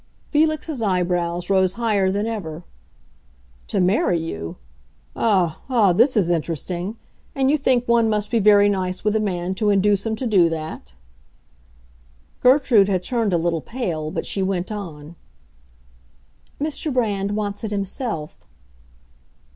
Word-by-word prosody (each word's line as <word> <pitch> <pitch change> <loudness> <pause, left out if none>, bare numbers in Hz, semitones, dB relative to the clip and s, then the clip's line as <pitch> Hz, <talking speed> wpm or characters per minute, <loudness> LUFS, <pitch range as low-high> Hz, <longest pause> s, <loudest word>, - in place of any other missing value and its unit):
Felix's 310 -2 0
eyebrows 175 -3 0
rose 190 -1 +2
higher 210 -4 +1
than 205 +2 -1
ever. 180 -8 -5 1.0
"To - - -1
marry 180 -1 +2
you! 80 - -6 0.6
Ah, 185 -8 +1
ah, 220 -8 +4
this 235 +6 +3
is 195 -5 +3
interesting. 175 +4 -3 0.4
And 270 0 +2
you 305 - +3
think 250 -3 +1
one 235 -1 +3
must 210 -1 -1
be 230 - +2
very 205 -1 +6
nice 185 -2 -2
with 210 0 +1
a - - +3
man 185 -3 -2
to 210 +2 0
induce 200 0 +2
him 225 -1 -2
to 255 - -5
do 190 -7 +4
that?" 155 - -6 1.5
Gertrude 250 -6 +5
had 185 -2 0
turned 230 -3 0
a 175 - +2
little 165 -1 -1
pale, 170 - -4
but - - -4
she 195 - -2
went 190 0 -2
on, 165 -6 -8 1.4
"Mr. 305 +1 -2
Brand 205 -5 -1
wants 205 0 -3
it 220 - -2
himself." 200 - -3
200 Hz, 140 wpm, -22 LUFS, 175-225 Hz, 1.5 s, very